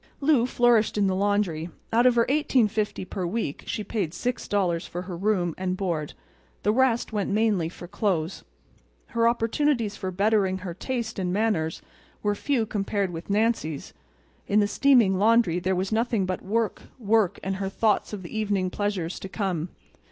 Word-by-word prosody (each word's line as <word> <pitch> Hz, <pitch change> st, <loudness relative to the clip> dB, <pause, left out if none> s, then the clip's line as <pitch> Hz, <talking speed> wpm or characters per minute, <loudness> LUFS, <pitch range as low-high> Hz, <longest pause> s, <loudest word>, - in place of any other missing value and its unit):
Lou 275 Hz, -4 st, +3 dB
flourished 240 Hz, -4 st, +3 dB
in 205 Hz, -, +3 dB
the 190 Hz, -, +2 dB
laundry. 195 Hz, -5 st, 0 dB, 0.2 s
Out 240 Hz, +2 st, +5 dB
of 250 Hz, -, +4 dB
her 235 Hz, -1 st, +4 dB
$18.50 220 Hz, -9 st, +1 dB
per 190 Hz, -, -4 dB
week 175 Hz, -4 st, -3 dB
she 215 Hz, -, -2 dB
paid 195 Hz, -6 st, -2 dB
$6. 195 Hz, -6 st, -1 dB
for 175 Hz, +1 st, -5 dB
her 185 Hz, -1 st, -6 dB
room 180 Hz, -2 st, 0 dB
and 185 Hz, 0 st, -1 dB
board. 170 Hz, -6 st, -2 dB, 0.5 s
The 210 Hz, -, +3 dB
rest 240 Hz, -2 st, +2 dB
went 205 Hz, -2 st, -1 dB
mainly 205 Hz, -5 st, +1 dB
for 175 Hz, 0 st, -10 dB
clothes. 185 Hz, -3 st, -1 dB, 0.7 s
Her 230 Hz, -2 st, +2 dB
opportunities 235 Hz, -1 st, +1 dB
for 190 Hz, -2 st, -4 dB
bettering 195 Hz, 0 st, +2 dB
her 185 Hz, -2 st, -6 dB
taste 225 Hz, +2 st, -4 dB
and 180 Hz, -1 st, -1 dB
manners 190 Hz, -6 st, 0 dB, 0.4 s
were 205 Hz, 0 st, +2 dB
few 235 Hz, +2 st, 0 dB
compared 200 Hz, -2 st, -1 dB
with 165 Hz, +2 st, -8 dB
Nancy's. 205 Hz, -8 st, 0 dB, 0.5 s
In 205 Hz, -, +3 dB
the 205 Hz, -, +3 dB
steaming 230 Hz, -7 st, +4 dB
laundry 220 Hz, -5 st, +4 dB
there 185 Hz, +1 st, 0 dB
was 190 Hz, +3 st, -2 dB
nothing 225 Hz, -3 st, +1 dB
but 185 Hz, 0 st, -3 dB
work, 220 Hz, +1 st, -1 dB, 0.2 s
work 220 Hz, -4 st, +2 dB
and 195 Hz, 0 st, -2 dB
her 195 Hz, 0 st, -2 dB
thoughts 210 Hz, +2 st, +1 dB
of 205 Hz, -3 st, -6 dB
the 170 Hz, -, -8 dB
evening 200 Hz, -4 st, 0 dB
pleasures 195 Hz, -5 st, -2 dB
to 195 Hz, -, -7 dB
come. 185 Hz, -5 st, -2 dB
205 Hz, 170 wpm, -26 LUFS, 185-225 Hz, 0.7 s, Out